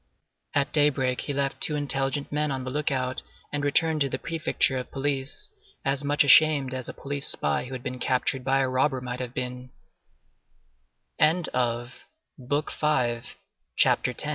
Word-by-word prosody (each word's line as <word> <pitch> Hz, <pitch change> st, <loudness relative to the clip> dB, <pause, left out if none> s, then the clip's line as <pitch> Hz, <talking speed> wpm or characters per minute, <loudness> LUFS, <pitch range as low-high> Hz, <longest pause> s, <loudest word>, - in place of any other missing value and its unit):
At 140 Hz, -1 st, +1 dB
daybreak 135 Hz, -4 st, +2 dB
he -, -, -4 dB
left 140 Hz, 0 st, -2 dB
two 150 Hz, -, +2 dB
intelligent 140 Hz, -1 st, 0 dB
men 150 Hz, +1 st, 0 dB
on 135 Hz, -2 st, -3 dB
the 130 Hz, -, -5 dB, 0.2 s
outlook, 130 Hz, -1 st, -1 dB, 0.3 s
and 145 Hz, -1 st, -1 dB
returned 155 Hz, +2 st, +2 dB
to 140 Hz, -, +2 dB
the 130 Hz, -, -2 dB
Prefecture 155 Hz, -4 st, 0 dB
of 125 Hz, -, -7 dB
Police, 135 Hz, -1 st, -2 dB, 0.3 s
as 135 Hz, +1 st, 0 dB
much 145 Hz, +1 st, +3 dB
ashamed 140 Hz, -2 st, +5 dB
as 130 Hz, -1 st, -5 dB
a -, -, -6 dB
police 140 Hz, +1 st, -3 dB
spy 75 Hz, -, +1 dB
who 130 Hz, -, -8 dB
had 125 Hz, -1 st, -6 dB
been 125 Hz, 0 st, -5 dB
captured 130 Hz, +1 st, 0 dB
by 135 Hz, +1 st, +2 dB
a 135 Hz, -, +1 dB
robber 130 Hz, +1 st, +1 dB
might 125 Hz, 0 st, -5 dB
have 125 Hz, -1 st, -5 dB
135 Hz, 140 wpm, -26 LUFS, 130-145 Hz, 0.3 s, ashamed